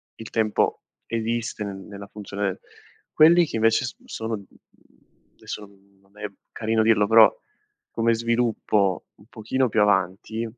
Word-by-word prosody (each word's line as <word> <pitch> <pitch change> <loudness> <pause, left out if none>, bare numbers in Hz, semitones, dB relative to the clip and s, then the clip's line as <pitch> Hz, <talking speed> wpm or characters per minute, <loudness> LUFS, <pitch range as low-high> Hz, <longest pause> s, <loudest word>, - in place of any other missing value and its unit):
il 115 - -10
tempo 110 -2 0 0.2
esiste 115 -1 -2
nel 100 - -5
nella 100 +1 -10
funzione 100 -2 -4 0.5
quelli 170 +3 +6
che 145 - -4
invece 115 +3 +3
s 130 - -6
sono, 110 0 -4
mhmm, 100 - -14 0.9
adesso - - -7
non 100 0 -24
non 100 +2 -22
è 105 - -4 0.3
carino 110 0 0
dirlo, 110 -2 +3
però 110 0 +8 0.6
come 115 0 +1
sviluppo 115 -4 0
un 100 - -21
pochino 125 +4 -1
più 105 - +2
avanti 105 +2 0
110 Hz, 140 wpm, -24 LUFS, 100-115 Hz, 0.9 s, però